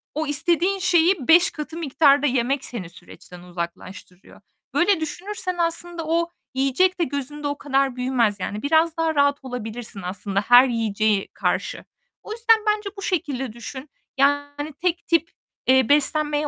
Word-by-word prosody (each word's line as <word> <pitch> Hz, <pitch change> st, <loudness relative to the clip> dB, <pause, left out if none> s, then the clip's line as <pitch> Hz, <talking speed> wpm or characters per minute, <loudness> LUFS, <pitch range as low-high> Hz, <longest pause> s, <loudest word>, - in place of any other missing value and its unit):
o 310 Hz, 0 st, -2 dB
istediğin 345 Hz, +6 st, +1 dB
şeyi 345 Hz, -4 st, +2 dB
5 345 Hz, +2 st, +6 dB
katı 305 Hz, +1 st, -7 dB
miktarda 290 Hz, -2 st, +3 dB
yemek 260 Hz, +1 st, 0 dB
seni 190 Hz, -9 st, -6 dB
süreçten 180 Hz, 0 st, -14 dB
uzaklaştırıyor. 180 Hz, +1 st, -9 dB, 0.3 s
Böyle 375 Hz, 0 st, +3 dB
düşünürsen 365 Hz, +3 st, -4 dB
aslında 335 Hz, 0 st, -2 dB
o 335 Hz, +1 st, +1 dB, 0.2 s
yiyecek 275 Hz, +8 st, +1 dB
de 340 Hz, -, +3 dB
gözünde 290 Hz, 0 st, -4 dB
o 285 Hz, 0 st, -3 dB
kadar 275 Hz, -2 st, 0 dB
büyümez 250 Hz, -5 st, 0 dB
yani. 205 Hz, +3 st, -4 dB
Biraz 320 Hz, +3 st, +2 dB
daha 325 Hz, -1 st, 0 dB
rahat 285 Hz, 0 st, +3 dB
olabilirsin 235 Hz, -4 st, -6 dB
aslında 195 Hz, +2 st, -3 dB
her 245 Hz, +4 st, +7 dB
yiyeceğe 215 Hz, -3 st, 0 dB
karşı. -, -, -2 dB, 0.4 s
O -, -, -9 dB
yüzden 450 Hz, 0 st, +3 dB
bence 420 Hz, -1 st, 0 dB
bu 395 Hz, -, -7 dB
şekilde 275 Hz, -, -2 dB
düşün. 260 Hz, +5 st, -9 dB, 0.3 s
Yani, 285 Hz, +2 st, 0 dB
tek 345 Hz, -1 st, -1 dB
tip, 335 Hz, -1 st, +1 dB, 0.4 s
eee, 260 Hz, -2 st, +4 dB
beslenmeye 295 Hz, +1 st, +2 dB
285 Hz, 145 wpm, -23 LUFS, 245-335 Hz, 0.4 s, her